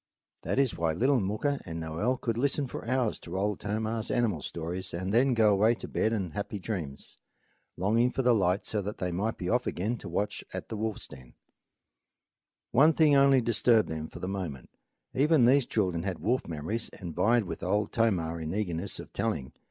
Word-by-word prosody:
That -, -, -2 dB
is 135 Hz, -4 st, +2 dB
why 80 Hz, -1 st, 0 dB
little 130 Hz, -, +3 dB
Mooka 110 Hz, +9 st, -1 dB
and 80 Hz, -1 st, -6 dB
Noel 80 Hz, +11 st, -1 dB
could 115 Hz, -3 st, -2 dB
listen 140 Hz, +3 st, +1 dB
for 125 Hz, -, -7 dB
hours 125 Hz, -3 st, 0 dB
to 85 Hz, +2 st, -6 dB
Old 100 Hz, 0 st, 0 dB
Tomah's 110 Hz, +2 st, -2 dB
animal 105 Hz, -10 st, +1 dB
stories 85 Hz, +5 st, -5 dB
and 95 Hz, +3 st, -3 dB
then 125 Hz, +2 st, +4 dB
go 110 Hz, -2 st, +5 dB
away 110 Hz, +4 st, +4 dB
to -, -, -8 dB
bed 110 Hz, -, 0 dB
and 95 Hz, -7 st, -2 dB
happy 105 Hz, +1 st, -4 dB
dreams, 90 Hz, -8 st, -6 dB, 0.6 s
longing 110 Hz, +7 st, +2 dB
for 130 Hz, -, -2 dB
the 125 Hz, 0 st, +5 dB
light 95 Hz, -2 st, +1 dB
so 105 Hz, -, -1 dB
that 105 Hz, +2 st, -5 dB
they 90 Hz, -1 st, -2 dB
might 100 Hz, +6 st, -1 dB
be 90 Hz, -, -4 dB
off 120 Hz, +5 st, +1 dB
again 110 Hz, +6 st, -2 dB
to 95 Hz, -, -8 dB
watch 105 Hz, +4 st, -2 dB
at -, -, -6 dB
the -, -, -4 dB
wolf's 110 Hz, 0 st, -3 dB
den. 65 Hz, -2 st, -14 dB, 1.4 s
One 145 Hz, +7 st, +6 dB
thing 150 Hz, -2 st, +5 dB
only 135 Hz, -1 st, +6 dB
disturbed 115 Hz, -1 st, +3 dB
them 80 Hz, 0 st, -4 dB
for -, -, -11 dB
a 90 Hz, -, -5 dB
moment. 90 Hz, -9 st, -5 dB, 0.4 s
Even 145 Hz, -1 st, +4 dB
these 135 Hz, +1 st, +4 dB
children 90 Hz, -6 st, 0 dB
had 95 Hz, -1 st, -3 dB
wolf 125 Hz, +8 st, 0 dB
memories 85 Hz, +9 st, -3 dB
and 90 Hz, -4 st, -6 dB
vied 115 Hz, +7 st, +3 dB
with 85 Hz, -4 st, -6 dB
Old 100 Hz, +3 st, 0 dB
Tomah 90 Hz, -8 st, +1 dB
in 80 Hz, +2 st, -4 dB
eagerness 95 Hz, -2 st, -2 dB
of -, -, -10 dB
telling. 65 Hz, -, -2 dB
105 Hz, 200 wpm, -29 LUFS, 90-120 Hz, 1.4 s, One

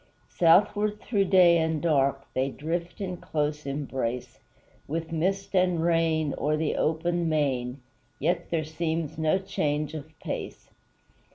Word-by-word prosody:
Southward 205 Hz, +5 st, +3 dB
through 205 Hz, -4 st, 0 dB
day 180 Hz, -3 st, +6 dB
and 160 Hz, -1 st, 0 dB
dark, 140 Hz, -4 st, +1 dB
They 130 Hz, +1 st, 0 dB
drift 170 Hz, +7 st, -4 dB
in 185 Hz, -2 st, -3 dB
close 150 Hz, -2 st, -2 dB
embrace, 130 Hz, -4 st, -3 dB, 0.5 s
With 165 Hz, +2 st, -3 dB
mist 190 Hz, +5 st, -1 dB
and 180 Hz, -2 st, +3 dB
rain, 165 Hz, -3 st, +2 dB
o'er 150 Hz, +1 st, +1 dB
the 155 Hz, -1 st, 0 dB
open 170 Hz, +2 st, 0 dB
main; 135 Hz, -4 st, -1 dB, 0.4 s
Yet 170 Hz, +3 st, -1 dB
there 160 Hz, -2 st, 0 dB
seems 160 Hz, 0 st, -3 dB
no 160 Hz, +3 st, +3 dB
change 150 Hz, -6 st, -2 dB
of 155 Hz, 0 st, -8 dB
place. -, -, -6 dB
160 Hz, 130 wpm, -27 LUFS, 150-175 Hz, 0.5 s, day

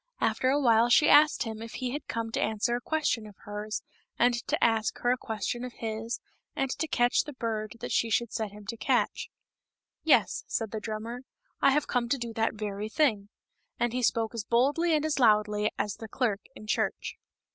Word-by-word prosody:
After 255 Hz, -, +1 dB
a 280 Hz, +2 st, +3 dB
while 235 Hz, -3 st, +4 dB
she 295 Hz, +5 st, +6 dB
asked 295 Hz, +1 st, +6 dB
him 220 Hz, -2 st, -6 dB
if 230 Hz, 0 st, -8 dB
he 255 Hz, -2 st, -3 dB
had 290 Hz, +3 st, -5 dB
come 230 Hz, -1 st, -3 dB
to -, -, -1 dB
answer 220 Hz, +2 st, 0 dB
a 245 Hz, -, -3 dB
question 290 Hz, -7 st, -1 dB
of 205 Hz, -, -13 dB
hers, 210 Hz, +1 st, -5 dB, 0.3 s
and 245 Hz, +1 st, +4 dB
to -, -, 0 dB
ask 225 Hz, -2 st, +2 dB
her 245 Hz, -, +1 dB
a -, -, +3 dB
question 240 Hz, 0 st, -4 dB
of 250 Hz, -1 st, -6 dB
his, 225 Hz, +1 st, -4 dB, 0.4 s
and 270 Hz, -1 st, -1 dB
to 320 Hz, -, 0 dB
catch 245 Hz, -4 st, +3 dB
the 295 Hz, -, -7 dB
bird 220 Hz, -4 st, -3 dB
that -, -, -4 dB
she 230 Hz, -, +2 dB
should 235 Hz, +1 st, 0 dB
set 220 Hz, -2 st, -2 dB
him 205 Hz, 0 st, -12 dB
to 230 Hz, +3 st, -5 dB
catch. -, -, 0 dB, 0.4 s
" -, -, -63 dB
Yes," -, -, +2 dB
said 225 Hz, -2 st, -2 dB
the 220 Hz, -, -3 dB
drummer, 220 Hz, +3 st, -5 dB, 0.2 s
" -, -, -43 dB
I 275 Hz, -, +6 dB
have 290 Hz, +2 st, +2 dB
come 240 Hz, -2 st, -1 dB
to 275 Hz, -, +2 dB
do 235 Hz, -2 st, -5 dB
that 225 Hz, 0 st, 0 dB
very 210 Hz, 0 st, -4 dB
thing." 220 Hz, -8 st, +1 dB, 0.5 s
And 240 Hz, 0 st, +1 dB
he 250 Hz, -, -1 dB
spoke 230 Hz, -1 st, +1 dB
as 230 Hz, -2 st, -3 dB
boldly 285 Hz, +9 st, +2 dB
and 305 Hz, 0 st, 0 dB
as 305 Hz, -2 st, 0 dB
loudly 210 Hz, -2 st, +3 dB
as 205 Hz, 0 st, -2 dB
the 225 Hz, -, -8 dB
clerk 215 Hz, -3 st, -1 dB
in 215 Hz, -, -11 dB
church. 210 Hz, -, -1 dB
230 Hz, 215 wpm, -29 LUFS, 215-250 Hz, 0.5 s, she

